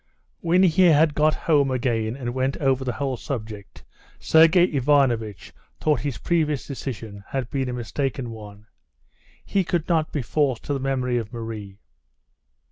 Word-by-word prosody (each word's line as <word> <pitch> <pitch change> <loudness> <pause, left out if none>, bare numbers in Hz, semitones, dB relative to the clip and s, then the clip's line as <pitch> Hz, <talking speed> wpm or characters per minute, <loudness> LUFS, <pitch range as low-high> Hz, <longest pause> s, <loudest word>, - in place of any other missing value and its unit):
When 175 +2 +3
he 185 +1 +4
had 155 -1 +4
got 155 +1 +2
home 145 -4 +2
again 120 -3 -1
and 120 -3 -4
went 130 +1 -1
over 135 -2 +1
the 125 -2 -2
whole 135 0 -2
subject, 110 -6 -7 0.3
Sergey 165 +2 +5
Ivanovitch 130 - +1 0.3
thought 150 -4 +1
his 140 -4 -3
previous 155 -5 0
decision 115 -7 -7
had 130 -3 -4
been 135 -2 -1
a - - -3
mistaken 125 +1 -3
one. 105 -2 -11 0.8
He 195 - +1
could 170 -2 -2
not 160 -3 +1
be 145 - -2
false 135 -1 0
to 145 - -3
the 140 - -2
memory 130 -2 0
of 110 -1 -7
Marie. 110 -4 -7
135 Hz, 155 wpm, -23 LUFS, 115-150 Hz, 0.8 s, Sergey